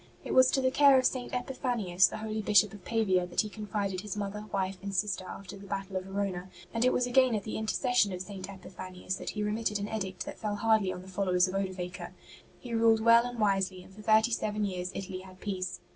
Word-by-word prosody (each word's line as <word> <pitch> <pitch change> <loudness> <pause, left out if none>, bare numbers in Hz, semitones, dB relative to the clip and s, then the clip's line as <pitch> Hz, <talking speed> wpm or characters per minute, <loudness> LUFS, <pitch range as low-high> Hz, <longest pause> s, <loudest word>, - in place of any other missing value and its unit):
It - - -3
was 260 0 +7
to 270 - +1
the 260 0 +2
care 275 0 +6
of 255 - +2
St. 250 -2 0
Epiphanius, 240 -8 +1
the - - -6
holy 215 0 -3
Bishop 210 -1 +4
of 205 -3 -11
Pavia, 190 -6 +1
that 175 - +1
he 215 - -5
confided 205 -3 -3
his 210 0 -5
mother, 205 +1 -4
wife 190 -1 -1
and 200 0 -5
sister 190 -1 0
after 200 +1 -8
the 200 0 -11
battle 195 0 -4
of 185 0 -2
Verona; 195 -2 -3 0.2
and 230 +1 +1
it 255 - +4
was 250 - +1
again 250 -1 +4
at 205 - -2
the 215 - -5
inter 220 0 -1
cession 245 -6 +2
of 180 - -4
St. 190 -1 -7
Epiphanius 185 -1 -6
that - - -5
he 210 - -3
remitted 210 0 -1
an 205 0 -3
edict 195 -4 -4
that - - -8
fell 210 -1 -2
hardly 215 -2 +2
on 180 - -7
the - - -13
followers 185 -1 +2
of 185 - -5
Odovaker. 185 -2 -4 0.5
He 245 -2 -7
ruled 225 -1 +4
well 230 +1 +6
and 245 0 -7
wisely, 195 -3 +1
and 190 - -16
for 210 - -11
thirty 220 +2 +4
seven 210 -2 -1
years 180 -2 -3
Italy 190 -1 -5
had 185 0 -13
peace. 185 -3 -4
205 Hz, 235 wpm, -30 LUFS, 185-220 Hz, 0.5 s, was